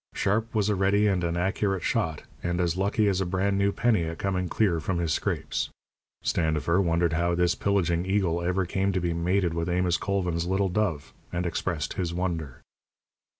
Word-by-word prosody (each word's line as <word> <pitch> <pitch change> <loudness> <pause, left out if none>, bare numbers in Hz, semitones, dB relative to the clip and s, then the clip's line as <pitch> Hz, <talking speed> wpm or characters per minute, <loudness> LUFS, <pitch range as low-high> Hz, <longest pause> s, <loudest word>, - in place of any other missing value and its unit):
Sharp 110 +3 0
was 105 -2 +2
a 105 - +2
ready 100 +2 +2
and 95 -4 +2
an 85 0 -1
accurate 95 0 0
shot, 80 -2 -1 0.2
and 85 0 -1
as 85 -2 +1
lucky 100 +3 +1
as 95 -1 +1
a - - 0
brand 100 +2 0
new 100 0 +3
penny 110 -4 +2
at 80 0 -5
coming 90 -1 -1
clear 95 -7 +2
from 85 +4 -2
his 85 -3 0
scrapes. - - -2 0.5
Standifer 80 +2 +1
wondered 85 -2 +1
how 85 +2 +1
this 90 0 +2
pillaging 90 -3 0
eagle 95 -4 +1
ever 90 +2 0
came 95 +2 0
to 95 - +1
be 85 -1 -1
mated 85 +1 +1
with 85 +1 -2
Amos 90 0 +2
Colvin's 90 -4 -1
little 95 +1 +1
dove, 90 -7 -1 0.2
and 85 +1 -2
expressed 85 -2 -2
his 85 -3 -2
wonder. 85 -7 -3
90 Hz, 190 wpm, -27 LUFS, 85-100 Hz, 0.5 s, new